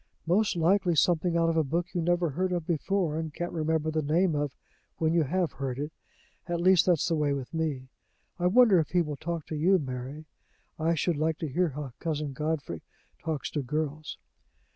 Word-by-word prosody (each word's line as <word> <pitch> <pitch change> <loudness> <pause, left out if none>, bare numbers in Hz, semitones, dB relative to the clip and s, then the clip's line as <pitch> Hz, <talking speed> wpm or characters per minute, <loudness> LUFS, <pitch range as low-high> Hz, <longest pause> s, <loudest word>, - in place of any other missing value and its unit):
"Most 200 +5 +2
likely 175 +1 +3
something 170 +2 +2
out 165 0 +3
of 165 - 0
a 160 - +4
book 170 +5 -2
you 175 - 0
never 175 -1 +1
heard 185 +6 -1
of 175 -3 -1
before, 170 -1 0
and 160 -1 -4
can't 175 +4 -4
remember 160 -1 0
the 155 0 0
name 165 +4 +2
of 145 -2 -2 0.4
when 160 0 +1
you 170 - +4
have 170 +4 0
heard 135 -2 -4
it 145 +2 -4 0.6
at 170 -1 -1
least 185 0 +5
that's 175 -4 +3
the 170 - +1
way 150 -2 +1
with 135 0 -5
me. 150 -5 -2 0.5
I 175 - +2
wonder 215 -2 +6
if 155 - -1
he 175 -1 +2
will 150 -2 -4
talk 170 +1 -4
to 155 - -5
you, 180 +6 +4
Mary? 135 +1 -5 0.5
I 165 +2 +2
should 165 +1 0
like 160 +1 0
to 160 - -3
hear 175 +5 +1
how 145 -1 -6
Cousin 150 -4 -2
Godfrey 150 - -3 0.4
talks 160 -3 -3
to 150 - -1
girls." 150 +3 -3
160 Hz, 205 wpm, -28 LUFS, 150-175 Hz, 0.6 s, wonder